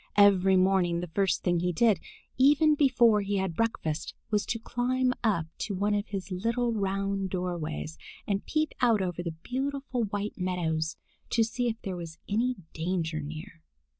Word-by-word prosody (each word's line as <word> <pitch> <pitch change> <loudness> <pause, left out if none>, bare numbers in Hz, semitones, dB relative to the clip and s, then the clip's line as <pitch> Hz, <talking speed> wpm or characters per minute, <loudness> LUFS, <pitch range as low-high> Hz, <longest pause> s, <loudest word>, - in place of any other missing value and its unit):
Every 195 -2 +6
morning 185 -2 +3
the 175 -1 -6
first 195 -2 +1
thing 175 -2 +2
he 180 +1 0
did, 215 +3 +3 0.4
even 295 +4 +5
before 245 -7 +4
he 200 0 -1
had 190 -3 -1
breakfast, 160 -8 -1 0.2
was 210 -1 +1
to 230 - -1
climb 250 +2 0
up 200 -8 +2
to 200 - -2
one 205 +2 +1
of 205 0 0
his 195 -1 -5
little 230 +5 0
round 195 -1 -1
doorways 155 - -3 0.3
and 200 -1 -1
peep 310 -1 0
out 230 -5 +4
over 180 -1 -3
the 170 -2 -4
beautiful 265 -2 -2
white 205 0 -3
meadows, 165 -3 -1 0.3
to 230 - +3
see 245 +2 -1
if 225 -1 -2
there 185 -2 -3
was 165 -2 -7
any 240 +5 +1 0.2
danger 165 -1 -1
near. 155 +2 -8
195 Hz, 165 wpm, -29 LUFS, 175-230 Hz, 0.4 s, Every